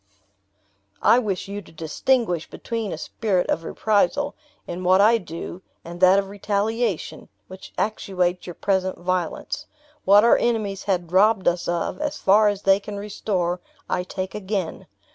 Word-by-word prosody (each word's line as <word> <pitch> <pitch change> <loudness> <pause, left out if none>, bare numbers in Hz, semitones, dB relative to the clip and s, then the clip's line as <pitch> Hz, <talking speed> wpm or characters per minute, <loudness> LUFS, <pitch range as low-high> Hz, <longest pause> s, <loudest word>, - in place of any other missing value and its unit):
"I 240 - +6
wish 200 -7 -3
you 200 +1 -5
to - - -17
distinguish 175 - 0
between 225 -4 -4
a - - -4
spirit 190 +2 -1
of 165 - -1
reprisal, 220 - +1 0.3
in 180 +2 -6
what 185 +1 +5
I 225 +3 +5
do, 170 0 -7 0.2
and 175 +1 -9
that 185 +1 +7
of 200 0 0
retaliation, 205 +1 -2 0.2
which 185 0 -11
actuates 185 -4 -1
your 175 - -7
present 190 -1 0
violence. 180 -2 -3 0.4
What 205 +2 +6
our 235 - +6
enemies 215 -5 -1
had 180 -4 -1
robbed 195 +1 +4
us 175 0 +1
of, 175 - -2
as 300 -1 -2
far 210 +2 +4
as 205 -1 -1
they 195 0 +5
can 205 0 -7
restore, 185 -3 -2 0.3
I 180 - 0
take 185 +1 -5
again. 195 -4 -3
195 Hz, 155 wpm, -23 LUFS, 180-210 Hz, 0.4 s, that